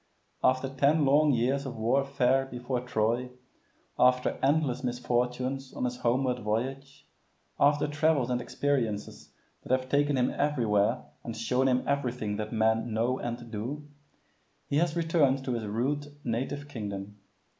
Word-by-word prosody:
After 130 +1 +3
ten 140 +3 +2
long 145 +2 +5
years 135 +3 +1
of 125 - -6
warfare 135 +2 +2
before 125 0 -3
Troy, 120 +1 0 0.7
after 125 0 +3
endless 140 -2 +1
misfortunes 125 +2 -1
on - - -3
his 125 0 -2
homeward 125 +1 +1
voyage, 130 +6 -3 0.5
after 145 +1 +4
travels 150 -4 +1
and 125 0 0
experiences 120 -9 -2 0.3
that - - -8
have 130 0 +1
taken 145 -1 +2
him 125 0 +2
everywhere 120 -5 +1 0.2
and 115 -2 -6
shown 125 +4 +1
him 125 -1 +2
everything 125 -7 -1
that 110 0 -4
men 110 +1 +1
know 120 +4 0
and 120 -1 -5
do, 130 +8 -5 0.8
he 140 - -1
has 170 0 +1
returned 155 -6 +2
to 130 - -1
his 115 -3 -3
rude 135 +7 -1 0.2
native 135 +5 -3
kingdom. 105 -5 -6
125 Hz, 140 wpm, -29 LUFS, 120-140 Hz, 0.8 s, long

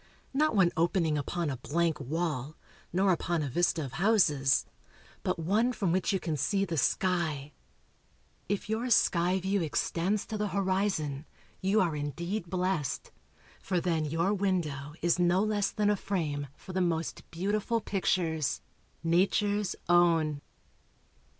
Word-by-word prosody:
Not 300 -2 +2
one 185 -4 +4
opening 165 -1 +2
upon 155 +2 -2
a 130 - -4
blank 165 +6 0
wall, 150 0 -3 0.3
nor 190 +2 +3
upon 170 -2 0
a 140 - -2
vista 165 +2 +1
of 130 - -7
houses, 160 -7 +3 0.6
but - - -1
one 205 +9 +2
from 195 -7 0
which 185 +3 +1
you 195 - +1
can 160 -4 -2
see 195 +8 +1
the 170 - -3
sky. 155 -3 0 1.0
If 205 0 -1
your 225 +4 -1
sky 180 -4 +3
view 190 +1 0
extends 175 +5 0
to 215 -2 -5
the 210 - 0
horizon, 185 -7 -1 0.3
you 195 +3 +2
are 170 -4 +1
indeed 170 +6 -3
blest; 180 -6 -1 0.5
for 185 -2 0
then 165 -3 0
your 165 +6 +1
window 160 -8 -1
is 175 +1 +2
no 175 +2 +3
less 210 -2 +1
than 210 -1 +1
a - - +2
frame 155 -8 -2
for 185 - -10
the 185 - +1
most 165 -2 -2
beautiful 205 +6 -1
pictures 170 -7 0 0.4
nature's 200 +4 +2
own. 165 -4 +3
175 Hz, 145 wpm, -30 LUFS, 155-195 Hz, 1.0 s, one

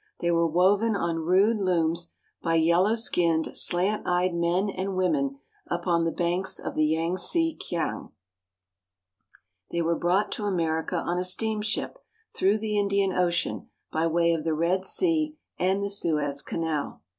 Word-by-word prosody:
They 170 - 0
were 170 0 +3
woven 195 +7 +3
on 170 -4 -1
rude 200 +5 +4
looms 170 -3 0 0.3
by 165 -1 0
yellow 170 +6 +3
skinned, 170 -8 +1
slant 190 +5 +1
eyed 180 0 +1
men 170 +3 +1
and 195 0 -3
women 140 -7 0 0.3
upon 175 -1 0
the 165 - 0
banks 175 +3 -1
of - - -5
the 155 0 +2
Yangtze 180 - 0
Kiang. 165 -3 -3 1.6
They 170 0 -1
were 165 +1 +1
brought 185 +5 +1
to 210 - -3
America 165 -3 -1
on 175 +1 -1
a - - -1
steamship 220 - -1 0.4
through 195 +3 +3
the 210 -1 -1
Indian 200 -1 +1
Ocean, 175 -1 -1 0.2
by 160 +1 +1
way 170 +1 +2
of 160 -2 -2
the 160 -1 0
Red 175 +4 0
Sea 310 - 0 0.2
and 190 +2 +1
the 200 - -1
Suez 150 -7 0
Canal. 160 - -3
175 Hz, 150 wpm, -26 LUFS, 165-200 Hz, 1.6 s, rude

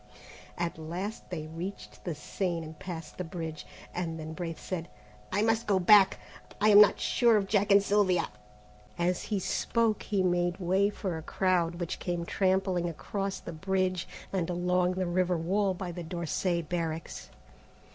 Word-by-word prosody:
At 170 -2 -2
last 180 +7 -5
they 165 -4 -4
reached 155 - -7
the 170 - -2
Seine 170 +2 -3
and 155 -1 -10
passed 165 -4 -7
the - - -1
bridge, 165 -2 -6 0.3
and 165 -2 -3
then 155 0 -6
Braith 165 -2 -5
said: 170 -3 -4 0.4
"I 205 +3 +2
must 225 +1 +1
go 200 -2 +3
back. 190 +2 +6 0.4
I 210 +2 +4
am 205 0 +10
not 210 - +6
sure 235 -3 +4
of 200 - +1
Jack 205 0 +1
and 200 0 +7
Sylvia." 200 -3 +2 0.7
As 175 +1 0
he 210 - -1
spoke, 220 +3 0
he 200 -3 0
made 175 -1 +1
way 190 +3 +2
for 190 -5 -4
a - - -7
crowd 175 0 +1
which 170 -1 -4
came 175 -2 -2
trampling 185 -2 +1
across 195 +4 -3
the 170 - -8
bridge, 185 +1 -1 0.3
and 180 -3 0
along 180 +1 +1
the 185 0 0
river 180 0 +1
wall 190 +4 +1
by 180 -1 -5
the 175 +1 -6
d'Orsay 170 +1 -1
barracks. 165 0 -4
180 Hz, 165 wpm, -30 LUFS, 170-195 Hz, 0.7 s, am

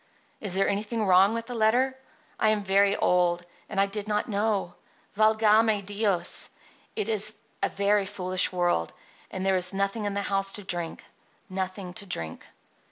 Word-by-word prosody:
Is 195 -4 -2
there 195 - +2
anything 215 +2 -1
wrong 195 +4 +5
in 230 - -3
the 245 - -6
letter? 245 +4 +2 0.4
I 215 - +4
am 215 -1 +1
very 200 +1 +3
old; 175 -1 +2 0.2
and 195 - -2
I 195 - +5
did 205 +1 -4
not 210 -1 0
know. 205 -4 -1 0.4
Valgame 215 -1 +4
Dios! 205 -2 -1 0.5
it 425 - -1
is 215 0 0 0.3
a - - +1
very 200 0 +1
foolish 185 -2 +2
world; 175 - 0 0.4
and 190 0 -4
there 190 -1 +3
is 180 +2 -1
nothing 200 +2 -1
in 200 -1 -2
the 200 - -1
house 195 0 -1
to 205 - -1
drink— 175 -3 -3 0.5
nothing 185 -1 -4
to 200 0 -5
drink." 80 - -5
200 Hz, 165 wpm, -27 LUFS, 185-215 Hz, 0.5 s, wrong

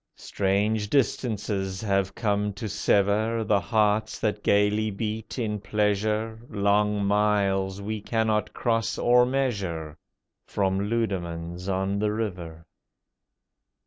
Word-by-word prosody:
Strange 105 +2 0
distances 105 -7 0
have 100 -2 0
come 105 -2 0
to 105 +3 -5
sever 105 +3 +1
The 105 -1 +2
hearts 110 0 +1
that 105 -1 -1
gaily 105 +2 +2
beat 110 +3 -4
in 105 -4 -2
pleasure, 105 +2 0
Long 105 0 +1
miles 100 -1 +1
we 110 +1 -3
cannot 110 -1 0
cross 115 -1 -1
or 125 0 +4
measure— 100 - -2 0.5
From 100 0 0
Leudemanns 90 -5 -3
on 95 +1 0
the 105 0 +1
River. 90 -7 -5
105 Hz, 110 wpm, -26 LUFS, 100-110 Hz, 0.5 s, or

